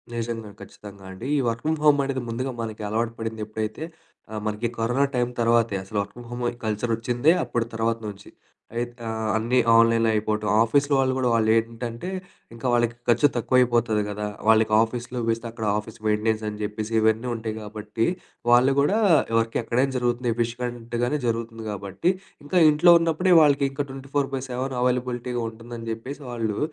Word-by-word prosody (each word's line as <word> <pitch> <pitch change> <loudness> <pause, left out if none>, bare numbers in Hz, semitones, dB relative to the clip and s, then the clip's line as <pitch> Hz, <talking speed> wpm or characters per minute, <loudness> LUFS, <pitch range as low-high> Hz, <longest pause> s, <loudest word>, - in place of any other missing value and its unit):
నిజంగా 115 -2 -4
ఖచ్చితంగా 100 -2 -12
అండి. 95 +7 -7
ఈ - - +2
వర్క్ 115 0 -1
ఫ్రమ్ 160 0 0
హోమ్ 145 -1 +5
అనేది 135 -1 -2
ముందుగా 130 +3 -2
మనకి 110 -1 -5
అలవాటు 115 +2 -1
పడింది 110 -1 -4
ఎప్పుడైతే 110 +5 -4 0.5
ఆహ్, 105 - -4
మనకి 105 +2 -1
కరోనా 120 +5 +2
టైమ్ 125 0 0
తర్వాతే. 115 -2 +3
అసలు 100 +2 -6
వర్క్ 100 0 -7
ఫ్రమ్ 120 -1 -11
హోమ్ 120 0 -4 0.2
కల్చర్ 110 +2 -1
వచ్చిందే 120 +6 +2
అప్పుడు 115 -1 -1
తర్వాత 115 0 0
నుంచి. 100 -1 -9 0.5
అయిత 120 +1 -2 0.2
ఆహ్, 110 -1 -2
అన్నీ 120 +3 +1 0.2
ఆన్‌లైన్‌లో 115 0 +5
అయిపోవటం, 105 0 -1 0.2
ఆఫీస్‌లో 140 +5 +2
వాళ్ళు 130 -1 +2
కూడా 130 -2 +1
వాళ్లేంటంటే 115 +5 0 0.4
ఇంకా 115 +2 -4
వాళ్ళకి 120 -1 +2
ఖర్చు 120 +4 +5
తక్కువ 125 +2 +1
అయిపోతది 120 -3 +2
కదా! 105 +1 -3 0.2
వాళ్ళకి 110 -1 +4
ఆఫీస్‌లో 120 +2 -5
వేస్తే 115 +1 -1
అక్కడ 115 -1 -5
ఆఫీస్ 110 +2 -10
మెయింటెనెన్స్ 110 +1 +1
అని 105 - -7
చెప్పేసి 105 +1 -4
ఇవన్నీ 110 +2 +2
ఉంటాయి 110 -1 -4
కాబట్టి 105 +1 -3 0.5
వాళ్ళు 125 +3 +5
కూడా 170 +10 +3 0.4
వర్క్ 115 0 -1
ఎక్కడైనా 125 +4 0
జరుగుతుంది 120 0 0
ఎఫిషియెంట్‌గానే 120 +2 -2
జరుగుతుంది 115 -1 -3
కాబట్టి. 100 - -1 0.3
ఇంకా 165 +5 0
ఇంట్లో 165 +4 +6
ఉన్నప్పుడే 165 +3 +2
వాళ్ళకి 140 -2 +4
ఇంకా 140 +1 -3
24/7 135 -1 -3
అవైలబిలిటీగా 125 -1 -1
ఉంటుందని 115 0 -8
చెప్పేసి 130 +6 -8
వాళ్ళు 110 -3 -2
115 Hz, 160 wpm, -24 LUFS, 110-125 Hz, 0.5 s, ఇంట్లో